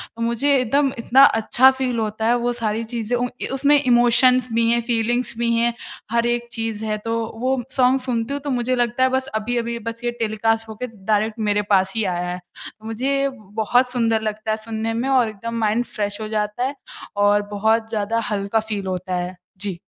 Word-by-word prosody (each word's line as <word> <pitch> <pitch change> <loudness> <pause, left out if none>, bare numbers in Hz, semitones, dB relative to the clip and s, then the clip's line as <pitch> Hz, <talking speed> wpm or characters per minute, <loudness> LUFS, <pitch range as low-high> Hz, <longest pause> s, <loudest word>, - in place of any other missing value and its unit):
तो 230 - -8
मुझे 235 +5 +1
एकदम 270 +3 +2
इतना 255 +4 +5 0.2
अच्छा 245 +4 +5
फ़ील 260 -3 -2
होता 220 0 -2
है। 240 - +4
वो 245 - +1
सारी 220 0 -1
चीज़ें 235 0 -1
उ 245 +1 0
इ - - -2
उसमें, 285 +2 +4 0.2
इमोशंस 245 +1 +4
भी 230 0 +3
हैं, 235 0 +3
फ़ीलिंग्स 240 +1 0
भी 235 0 +2
हैं, 235 +1 +2 0.4
हर 235 0 +2
एक 240 0 -2
चीज़ 225 -2 -3
है। 215 0 -1
तो 230 - -1 0.3
वो 260 +1 +2 0.2
सॉन्ग 260 0 +4
सुनती 235 +1 -1
हूँ, 285 - -3
तो 290 - -5
मुझे 245 +1 0
लगता 240 +1 +1
है 260 - +4
बस 260 0 -4
अभी-अभी 235 +1 -2
बस 230 +1 -9
ये 240 - 0
टेलीकास्ट 225 +1 0
हो 220 - -7
के 250 - -1 0.2
डायरेक्ट 215 +2 +1
मेरे 205 0 +2
पास 190 0 +3
ही 220 - +1
आया 175 0 -2
है। 180 - -6 0.4
तो 220 - -16
मुझे 260 +5 -1 0.5
बहुत 245 +3 +2
सुंदर 225 -3 +1
लगता 215 +1 -5
है 215 - 0
सुनने 225 0 -2
में - - -1
और 255 -3 +4
एकदम 230 +3 -5
माइंड 220 +3 +1
फ्रेश 205 0 -2
हो 215 - -3
जाता 210 +3 -1
है - - -15 0.5
और 205 0 +4
बहुत 220 +2 +1
ज़्यादा 220 +1 -1
हल्का 200 +2 0
फ़ील 205 -2 -3
होता 185 0 -4
है। 180 +1 -6 0.3
जी। 195 -4 -2
230 Hz, 210 wpm, -21 LUFS, 215-245 Hz, 0.5 s, इतना